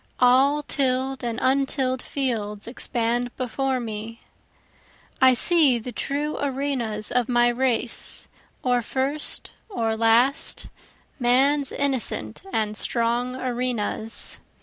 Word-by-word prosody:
All 270 +4 +4
till'd 265 -1 -1
and 235 -1 -2
untill'd 260 -1 +1
fields 215 -7 -3
expand 240 0 -1
before 260 +1 -1
me, 225 0 -6 1.0
I 260 -1 +7
see 295 -2 +4
the 235 +2 -6
true 290 +4 -3
arenas 260 -6 -1
of 245 -1 +1
my 240 0 +4
race, 240 -1 -1 0.4
or 245 -1 +2
first 270 +5 -2 0.2
or 225 - -1
last, 230 +5 +2 0.5
Man's 270 +3 +3
innocent 275 -4 -2
and 215 -1 -1
strong 240 +3 0
arenas. 245 -3 -1
250 Hz, 105 wpm, -24 LUFS, 235-270 Hz, 1.0 s, I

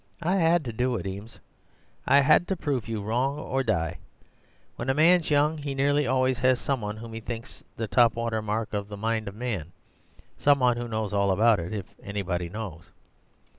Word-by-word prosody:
'I 180 +4 +2
had 165 -3 +3
to 120 - -4
do 125 +2 0
it, 110 - -4
Eames; 100 +4 -7 0.7
I 140 - +6
had 155 +5 +4
to 190 - 0
prove 140 -8 -2
you 110 -3 -3
wrong 125 +7 0
or 135 -2 -2
die. 90 -10 -1 0.8
When 120 - -4
a 135 - +2
man's 165 +2 +4
young, 150 +1 +2
he 140 -2 -4
nearly 145 +1 +2
always 130 0 +1
has 130 -1 +3
some 135 -3 -1
one 105 0 -4
whom 115 +1 -9
he 115 - -5
thinks 115 +2 -8
the 115 - -2
top 115 +2 +4
water 115 -1 -1
mark 110 +1 -3
of 100 -1 -2
the 105 -1 -8
mind 110 +1 -1
of 100 - -6
man— 105 -9 -4 0.6
some 145 0 +4
one 125 -2 +2
who 120 0 -4
knows 110 -2 -3
all 100 -1 +2
about 105 +2 +4
it, 85 +1 -5
if 105 -4 -4 0.2
anybody 95 -4 -3
knows. 95 -5 -7
115 Hz, 205 wpm, -26 LUFS, 105-135 Hz, 0.8 s, I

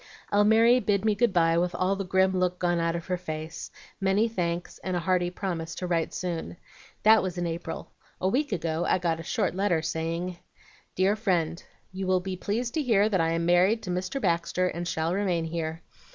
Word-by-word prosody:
"Almiry 220 +4 +5
bid 205 -3 0
me 215 - +4
good 230 +2 +2
by 165 -2 +3
with 180 +1 -1
all 185 +2 +1
the 195 - -3
grim 190 0 +2
look 180 -1 +1
gone 175 -1 +1
out 165 0 0
of 170 -1 -4
her 180 -1 -1
face, 160 -2 -6 0.3
many 195 +3 +2
thanks, 175 -5 -3
and 185 -1 -2
a - - 0
hearty 175 0 +1
promise 175 -3 -4
to 180 - -4
write 170 -2 0
soon. 165 - -4 0.5
That 220 0 +7
was 185 -2 -4
in 175 - -1
April. 170 +1 -5 0.3
A 185 - 0
week 270 +8 0
ago 165 -3 -1
I - - +3
got 170 -2 -1
a - - -6
short - - -1
letter 180 -4 +1
saying, 165 +2 -3 0.6
"'DEAR 190 +3 +3
FRIEND, 175 -6 0 0.3
You 190 0 -4
will 185 0 +3
be 185 +1 -4
pleased 230 +6 -2
to 315 - 0
hear 215 -6 +3
that 190 -5 +2
I 165 0 +1
am 165 0 0
married 185 +6 +3
to 185 - -6
Mr. 185 +8 -2
Baxter, 180 -2 +1
and 175 0 -4
shall 160 0 -1
remain 185 -4 0
here. 165 0 -4
180 Hz, 210 wpm, -27 LUFS, 170-195 Hz, 0.6 s, That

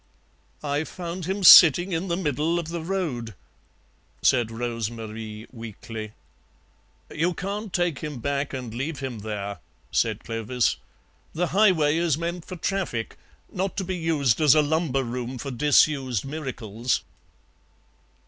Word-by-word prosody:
"I 145 +1 0
found 175 +1 -6
him 190 +2 -2
sitting 175 +1 +9
in 175 +2 -1
the 170 -1 -1
middle 155 0 0
of 170 -2 -3
the 170 0 -4
road," 155 - -3 0.9
said 120 -3 +3
Rose 115 -1 -3
Marie 110 -1 -7
weakly. 110 -2 -8 1.0
"You 165 +3 0
can't 200 +2 -4
take 175 -5 0
him 150 -3 -5
back 140 +3 -2
and 125 -4 -6
leave 135 +6 -3
him 130 -5 -5
there," 100 -2 -5 0.3
said - - 0
Clovis; 115 +2 -1 0.6
"the 175 +2 0
highway 175 -7 +4
is 165 -4 +1
meant 170 +1 -4
for 185 - -7
traffic, 180 - -2 0.4
not 190 0 -2
to 195 - 0
be 185 0 -3
used 160 -7 +1
as 150 -1 +6
a 155 - +5
lumber 150 -3 0
room 125 +1 -4
for 135 +3 -5
disused 135 -3 +2
miracles." 130 -6 -3
145 Hz, 140 wpm, -25 LUFS, 120-170 Hz, 1.0 s, sitting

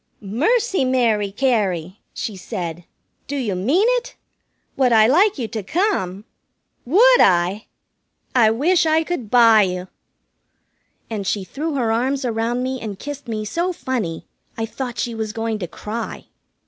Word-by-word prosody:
"Mercy, 360 - +1
Mary 230 -6 +1
Cary!" 200 -7 0
she 220 -4 -5
said, 175 -3 -6 0.4
"do 285 - -4
you 245 -8 -1
mean 265 - +2
it? - - -6 0.6
Would 255 -2 +2
I 220 -2 +6
like 365 - +4
you 240 -4 -3
to 220 - -4
come? 215 - -1 0.6
Would 470 - +6
I? 180 +3 +2 0.7
I 235 -4 +5
wish 325 +9 +2
I 315 +1 +3
could 315 -10 -4
buy 230 -2 +6
you!" 180 -1 -2 1.2
And 205 -3 -3
she 205 - -1
threw 295 - -4
her 235 -4 0
arms 260 +4 0
around 235 +1 -1
me 260 0 -3
and 210 -3 -5
kissed 285 +2 -7
me 215 -2 -3
so 340 - -1
funny 240 - -3 0.3
I 225 - -1
thought 245 +1 -6
she 235 - -2
was 220 -1 -4
going 225 -1 -2
to 180 - -4
cry. 220 +6 -6
230 Hz, 150 wpm, -21 LUFS, 210-275 Hz, 1.2 s, I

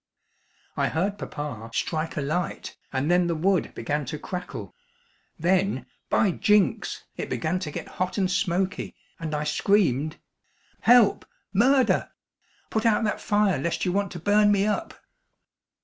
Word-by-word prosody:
I - - +1
heard 200 +5 -1
papa 125 -7 -6
strike 160 +1 -2
a - - 0
light 155 +5 -3 0.2
and 140 +4 0
then 175 0 +4
the 170 - 0
wood 185 +3 +1
began 145 +6 -2
to 140 +5 -4
crackle. 180 +4 -6 0.6
Then, 180 -5 +1 0.2
by 205 - +3
jinks! 210 +3 +1
it - - -4
began 185 - -1
to 180 -5 -4
get - - -6
hot 185 +2 -1
and 190 -2 +1
smoky 185 0 -1 0.2
and 155 -2 -3
I 150 - -1
screamed: 155 - +1 0.6
"Help! 235 -3 +5 0.3
Murder! 255 +6 +3 0.6
Put 220 - 0
out 225 -1 +3
that 210 - -1
fire 205 -7 +2
lest 170 +5 -1
you 180 - +1
want 200 +1 0
to 175 - -6
burn 205 +4 +4
me 200 0 +3
up!" 215 +11 -2
180 Hz, 150 wpm, -26 LUFS, 155-205 Hz, 0.6 s, Help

